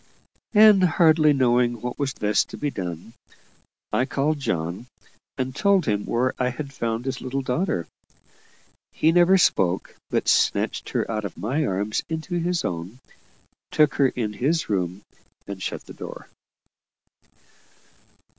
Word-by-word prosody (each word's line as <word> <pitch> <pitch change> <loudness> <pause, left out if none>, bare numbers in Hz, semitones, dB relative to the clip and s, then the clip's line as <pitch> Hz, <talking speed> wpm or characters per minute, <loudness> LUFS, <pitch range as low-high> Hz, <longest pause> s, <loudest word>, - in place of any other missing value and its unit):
And, 210 -2 +7
hardly 160 -3 +4
knowing 120 -3 +2
what 125 +2 -5
was 135 -2 -1
best 105 0 +1
to - - -8
be 145 -1 -2
done, 90 +1 -6 0.8
I 125 - +2
called 145 +3 -1
John, 85 - -3 0.5
and 130 0 -3
told 200 -1 +3
him 105 -3 -1
where 125 +2 +1
I 125 -1 +1
had 140 +2 -6
found 115 -1 -3
his 135 -1 -3
little 135 +1 -3
daughter. 125 - -1 1.1
He 160 - +2
never 175 +2 +5
spoke, 95 - +1
but - - -1
snatched - - +1
her - - -1
out 110 -1 -2
of 100 - -6
my 140 +8 -1
arms 100 +3 -1
into 160 +2 -3
his 175 0 -1
own, 90 +6 -4 0.7
took 150 -2 +3
her 135 - +6
in 115 -5 -3
his 150 +10 0
room, 95 -1 -2 0.4
and 100 -2 -7
shut - - -4
the - - -11
door. - - -9
130 Hz, 145 wpm, -24 LUFS, 105-155 Hz, 1.1 s, And